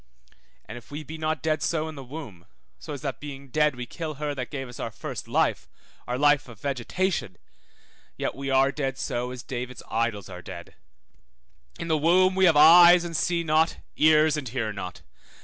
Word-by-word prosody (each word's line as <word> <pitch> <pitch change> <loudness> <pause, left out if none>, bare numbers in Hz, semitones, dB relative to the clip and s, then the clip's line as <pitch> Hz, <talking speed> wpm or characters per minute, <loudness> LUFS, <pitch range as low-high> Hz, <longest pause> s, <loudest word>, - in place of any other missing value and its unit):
And 120 +4 -8
if 120 - -22
we 150 +2 -6
be 160 +2 -9
not 155 0 -2
dead 155 -1 0
so 160 -1 -1
in 160 - -6
the 140 -3 -9
womb, 125 - -10 0.3
so 155 - -9
as 140 - -7
that 135 -5 -3
being 140 -2 -9
dead 150 0 +2
we 125 0 -5
kill 155 +4 -6
her 150 +1 -3
that 130 -3 -5
gave 135 -3 -5
us 120 - -11
our - - -3
first - - -7
life, - - 0 0.4
our 125 0 -2
life 145 0 +3
of 115 -4 -13
vegetation, 140 - -2 0.8
yet - - -2
we 135 0 -5
are 135 0 +4
dead 135 -2 -3
so 125 -1 -3
as 125 -1 -8
David's 125 -1 -6
idols 110 -4 -1
are 90 -1 -9
dead. - - -10 1.0
In 165 - -5
the 160 -2 +1
womb 185 +4 +4
we 190 0 +3
have 165 -4 +5
eyes 170 +3 +8
and 170 -1 -5
see 170 +2 0
not, 160 +1 +2 0.2
ears 155 0 +4
and 135 -5 -4
hear 110 -3 -2
not. 90 -3 -7
145 Hz, 200 wpm, -26 LUFS, 125-155 Hz, 1.0 s, eyes